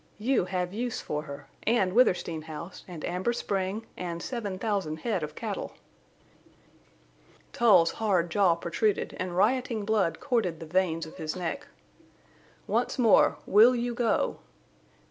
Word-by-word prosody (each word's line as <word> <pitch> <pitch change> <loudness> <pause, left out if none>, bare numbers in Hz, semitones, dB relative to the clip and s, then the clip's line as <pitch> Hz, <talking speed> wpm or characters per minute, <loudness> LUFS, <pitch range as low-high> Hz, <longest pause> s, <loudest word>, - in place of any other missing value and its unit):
You 230 -2 +1
have 180 0 -2
use 240 +2 -2
for 150 - -3
her—and 185 +7 -2
Withersteen 180 -8 +2
House 160 +3 -8
and 170 -4 -7
Amber 185 +7 -1
Spring 200 0 -2
and 170 -2 -4
seven 210 -7 -4
thousand 190 -7 -2
head 210 -7 -1
of 150 0 -5
cattle!" - - -4 1.8
Tull's 190 -8 +5
hard 185 -6 0
jaw 185 -2 +4
protruded, 190 +5 -1
and 180 -1 -3
rioting 230 +1 +1
blood 200 -7 +1
corded 215 - 0
the 165 - -7
veins 165 -1 0
of 160 - -12
his 155 +1 -4
neck. 185 - -4 1.0
"Once - - 0
more. 235 -4 +5
Will 225 +5 +6
you 240 0 -1
go?" 235 -2 0
190 Hz, 135 wpm, -28 LUFS, 170-225 Hz, 1.8 s, Will